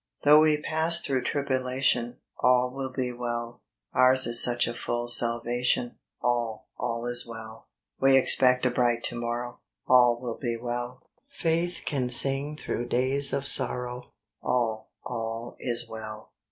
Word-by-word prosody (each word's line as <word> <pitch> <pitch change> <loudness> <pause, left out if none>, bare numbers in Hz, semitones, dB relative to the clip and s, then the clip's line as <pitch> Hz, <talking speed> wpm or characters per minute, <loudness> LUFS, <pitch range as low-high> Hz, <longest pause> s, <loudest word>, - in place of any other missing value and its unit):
HP - - +3
HOUGH 150 - +9
we 155 -1 +3
pass 160 +2 +3
through 135 -5 -1
tribulation, 130 -2 -1
^ - - -28 0.2
All 125 0 +3
will 135 -1 -5
be 130 -1 -3
well: 120 -1 -5 0.3
Ours 130 +1 +5
is 120 0 +4
such 120 -1 +2
a 120 - -4
full 120 0 -4
salvation, 120 +1 +1 0.3
All, 120 -3 -2
all 115 -1 -4
is 120 0 0
well. 115 -1 -10 0.3
We 135 0 +5
expect 125 -1 +4
a 125 - +2
bright 120 -1 0
to - - -2
morrow, 120 +1 -5 0.3
All 125 -2 +4
will 120 -2 -6
be 120 -3 -3
well: 120 +1 -5 0.3
Faith 175 -7 -2
can 130 -4 -2
sing 135 +4 +1
through 120 -5 -4
days 135 +3 +1
of 140 0 -3
sorrow, 125 -1 0 0.3
All, 115 -3 -2 0.2
all 115 -1 -5
is 120 -1 +1
well. 110 -1 -8
125 Hz, 155 wpm, -26 LUFS, 120-130 Hz, 0.3 s, HOUGH